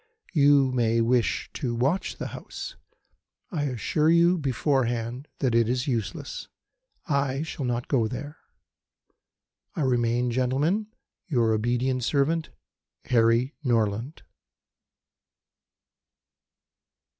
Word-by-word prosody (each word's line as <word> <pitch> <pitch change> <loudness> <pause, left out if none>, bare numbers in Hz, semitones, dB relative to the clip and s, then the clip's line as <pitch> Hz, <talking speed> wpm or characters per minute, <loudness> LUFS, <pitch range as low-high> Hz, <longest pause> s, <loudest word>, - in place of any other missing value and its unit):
You 140 -4 +5
may 115 -2 +2
wish 120 +1 +1
to 125 -6 -2
watch 140 +11 0
the - - -5
house. - - -8 0.8
I 150 -6 -1
assure 145 +4 +1
you 170 +2 +4
beforehand 130 -2 -1
that 130 -4 0
it 115 -1 +3
is 125 0 0
useless. 115 -6 -3 0.6
I 140 -3 0
shall 155 -4 -5
not 120 0 -2
go 120 -6 +2
there. 145 +6 -7 1.4
I - - -2
remain, 120 -2 +1
Gentlemen, 140 - +1 0.4
"Your 120 -8 +2
obedient 125 +3 0
servant, 150 +6 +1 0.6
"HARRY 115 +3 +3
NORLAND." 115 +2 0
130 Hz, 100 wpm, -26 LUFS, 120-145 Hz, 1.4 s, You